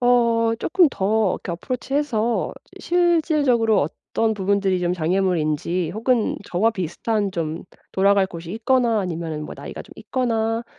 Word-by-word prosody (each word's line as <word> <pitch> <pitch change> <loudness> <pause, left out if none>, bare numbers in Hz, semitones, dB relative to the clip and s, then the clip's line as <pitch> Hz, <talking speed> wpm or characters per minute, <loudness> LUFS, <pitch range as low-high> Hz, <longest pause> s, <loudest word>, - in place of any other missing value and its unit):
어 235 -2 +3
쪼끔 350 +3 +3
더 210 -1 +1
이렇게 175 - -3
approach 250 +9 -4
해서 240 -6 0 0.2
이 - - -10
실질적으로 305 - +2
어떤 220 +8 -1
부분들이 195 -2 +1
좀 175 0 0
장애물인지 175 -1 0
혹은 230 +1 +1
'저와 205 +6 +1
비슷한 205 +2 -2
좀 165 -2 -3 0.3
돌아갈 195 0 +3
곳이 170 -2 -9
있거나 235 0 +2
아니면은 165 -4 -4
뭐 - - -8
나이가 - - -8
좀 - - -16
있거나 230 -2 -1
215 Hz, 350 characters per minute, -22 LUFS, 180-240 Hz, 0.3 s, 어